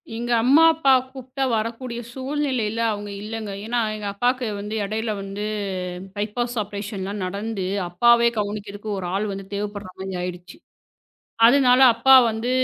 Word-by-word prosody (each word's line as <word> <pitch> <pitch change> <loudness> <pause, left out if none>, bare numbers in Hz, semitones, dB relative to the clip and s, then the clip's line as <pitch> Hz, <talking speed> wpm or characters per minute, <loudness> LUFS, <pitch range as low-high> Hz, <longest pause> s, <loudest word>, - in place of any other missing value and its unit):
எங்க 240 +1 -3
அம்மா, 280 +6 +6
அப்பா 295 -4 +2 0.2
கூப்ட்டா 260 0 -5
வரக்கூடிய 235 +2 -3
சூழ்நிலைல 260 -5 -2
அவங்க 205 0 -6
இல்லங்க. 215 -1 -5
ஏன்னா, 240 +2 0 0.2
எங்க 210 -1 -5
அப்பாவுக்கு 245 +3 0
வந்து 210 +2 -5
இடையில 220 +2 -2
வந்து 195 +1 -6 0.7
பைப்பாஸ் 235 +4 -2
ஆப்ரேஷன்லாம் 200 -1 -5
நடந்து, 200 +1 -3 0.2
அப்பாவே 235 +6 +4
கவனிக்கறதுக்கு 205 0 -4
ஒரு 180 - -4
ஆள் 205 +2 0
வந்து 195 0 -6
தேவைப்படுரா 205 -2 -5
மாரி 190 0 -5
ஆயிடுச்சு. 180 0 -7 0.9
அதனால 255 0 +5
அப்பா 265 +3 +6 0.2
வந்து 225 +3 -3
220 Hz, 135 wpm, -23 LUFS, 205-245 Hz, 0.9 s, அம்மா